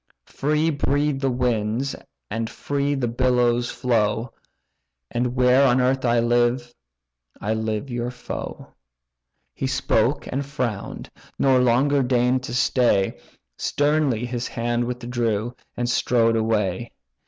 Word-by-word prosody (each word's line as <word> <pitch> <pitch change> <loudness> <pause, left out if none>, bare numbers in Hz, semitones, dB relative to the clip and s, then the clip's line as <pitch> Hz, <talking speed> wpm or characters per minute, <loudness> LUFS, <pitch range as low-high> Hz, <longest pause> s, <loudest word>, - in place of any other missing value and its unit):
Free 155 +3 0
breathe 145 0 0
the 135 - +1
winds, 120 +1 0 0.4
and 115 +1 -2
free 140 +4 -1
the 130 -3 -1
billows 120 0 +2
flow; 115 -1 0 0.8
And 125 +1 -1
where 125 +1 +5
on 125 0 +3
earth 130 +1 +1
I 120 0 +3
live, 120 +1 +1 0.7
I 105 +2 -1
live 110 +3 -2
your 120 0 -2
foe." 125 - -7 0.8
He 135 - -3
spoke 130 0 +1
and 135 +2 -2
frown'd, 125 -7 -4 0.3
nor 130 -2 +4
longer 130 +4 +3
deign'd 125 0 +2
to 120 - -6
stay, 120 -6 +2 0.4
Sternly 145 -5 +1
his 120 0 -3
hand 120 0 -1
withdrew, 120 -2 -2 0.2
and 120 - -1
strode 115 -1 +2
away. 110 -1 0
125 Hz, 120 wpm, -23 LUFS, 115-130 Hz, 0.8 s, where